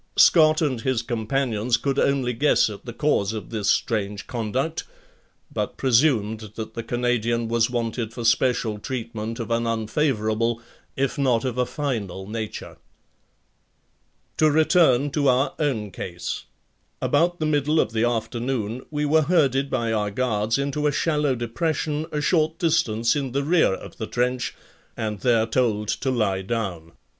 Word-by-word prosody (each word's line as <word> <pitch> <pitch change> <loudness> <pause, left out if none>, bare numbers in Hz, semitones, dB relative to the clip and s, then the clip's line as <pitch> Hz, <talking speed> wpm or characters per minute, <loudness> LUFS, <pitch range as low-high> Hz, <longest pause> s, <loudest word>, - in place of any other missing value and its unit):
Scott 155 -1 +6
and 130 -6 -1
his 130 -3 0
companions 115 -1 0
could 140 +1 -1
only 135 -3 +1
guess 120 -2 +3
at 100 - -10
the 120 - -5
cause 115 -6 +1
of 110 +1 -7
this 105 -3 -1
strange 105 -3 0
conduct, 130 +7 -2 0.7
but - - -3
presumed 120 -5 +2 0.2
that 110 0 -6
the 115 - -4
Canadian 120 -1 0
was 115 0 +2
wanted 115 -2 -2
for 115 0 -6
special 115 -2 +2
treatment 115 -2 -5
of 115 -1 -4
an 115 0 +1
unfavorable, 115 -1 0 0.4
if 135 +3 -1
not 125 -3 +2
of 125 -1 -2
a 125 - +1
final 110 - -3
nature. 110 0 -6 1.6
To 155 - +5
return 150 -3 +4
to 145 0 +1
our 130 +1 +3
own 115 -10 -1
case: 85 -1 -5 0.5
About 175 +4 +1
the 155 - 0
middle 150 +1 +2
of - - +1
the 110 0 +1
afternoon 120 0 -2
we 150 -1 -1
were 155 +2 +4
herded 140 -4 +2
by 115 -3 0
our 105 -1 0
guards 110 0 0
into 140 +2 -1
a - - +2
shallow 150 -2 +1
depression 150 +6 -2
a 150 - -1
short 160 0 +1
distance 120 -9 +1
in 135 -4 -2
the 140 +1 0
rear 160 - +3
of - - -11
the 110 - -4
trench 125 +1 -1 0.4
and 105 -2 -3
there 115 -3 +3
told 110 -3 0
to 135 - -1
lie 105 -7 0
down. 95 -6 -4
120 Hz, 155 wpm, -24 LUFS, 110-140 Hz, 1.6 s, Scott